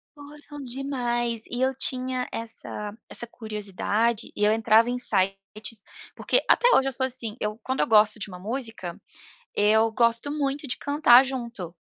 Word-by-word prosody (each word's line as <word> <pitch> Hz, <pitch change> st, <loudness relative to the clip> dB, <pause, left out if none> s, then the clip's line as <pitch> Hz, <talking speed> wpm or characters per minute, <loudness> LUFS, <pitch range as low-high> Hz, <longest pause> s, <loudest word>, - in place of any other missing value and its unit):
Foram 290 Hz, 0 st, -11 dB
demais, 240 Hz, -3 st, -2 dB
e 245 Hz, +1 st, -2 dB
eu 265 Hz, 0 st, +2 dB
tinha 255 Hz, -1 st, -2 dB
essa 210 Hz, -2 st, -5 dB
essa 235 Hz, -, -3 dB
curiosidade, 215 Hz, +1 st, -2 dB
e 210 Hz, -, +1 dB
eu 210 Hz, -, +4 dB
entrava 225 Hz, +1 st, +4 dB
em 250 Hz, -, -2 dB
sites, 200 Hz, +1 st, -2 dB, 0.3 s
porque, -, -, +2 dB
até 485 Hz, -, +5 dB
hoje 270 Hz, -, +3 dB
eu -, -, -2 dB
sou 260 Hz, +1 st, +3 dB
assim, 240 Hz, -4 st, -1 dB
eu 210 Hz, +1 st, -3 dB
quando 260 Hz, +3 st, -2 dB
eu -, -, +3 dB
gosto 215 Hz, 0 st, +4 dB
de 205 Hz, -, -6 dB
uma 180 Hz, -1 st, -9 dB
música, 225 Hz, -4 st, -5 dB, 0.6 s
eu 220 Hz, +2 st, +3 dB
gosto 235 Hz, +5 st, +1 dB
muito 285 Hz, -1 st, -2 dB
de 250 Hz, -, -3 dB
cantar 280 Hz, -3 st, +5 dB
junto 235 Hz, -10 st, -6 dB
235 Hz, 160 wpm, -25 LUFS, 215-260 Hz, 0.6 s, até